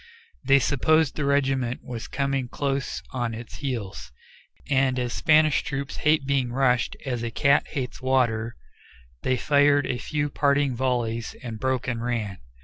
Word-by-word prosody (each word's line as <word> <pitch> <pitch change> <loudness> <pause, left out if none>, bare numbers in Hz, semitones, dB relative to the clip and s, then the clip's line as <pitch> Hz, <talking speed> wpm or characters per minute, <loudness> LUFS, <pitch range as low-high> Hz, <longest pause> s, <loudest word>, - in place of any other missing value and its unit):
They 140 - +5
supposed 150 +3 +2
the 150 - -2
regiment 135 -3 +1
was 120 -2 -6
coming 135 -2 -1
close 135 +1 -2
on 120 -3 -2
its 115 +1 -9
heels, 115 - -5 0.6
and 135 -2 +2
as 125 -1 -2
Spanish 155 -1 +4
troops 140 0 -4
hate 150 -2 +2
being 135 -3 0
rushed 125 -1 +1
as 125 -3 -2
a 120 - -2
cat 140 +5 +3
hates 130 -2 -5
water, 120 -3 +1 0.7
they 130 0 +1
fired 145 +1 +3
a 125 - -2
few 145 +2 -2
parting 140 -2 +2
volleys 120 -3 -1
and 115 -3 -6
broke 130 +1 -1
and 120 -2 -2
ran. 110 -6 -2
130 Hz, 150 wpm, -25 LUFS, 120-140 Hz, 0.7 s, They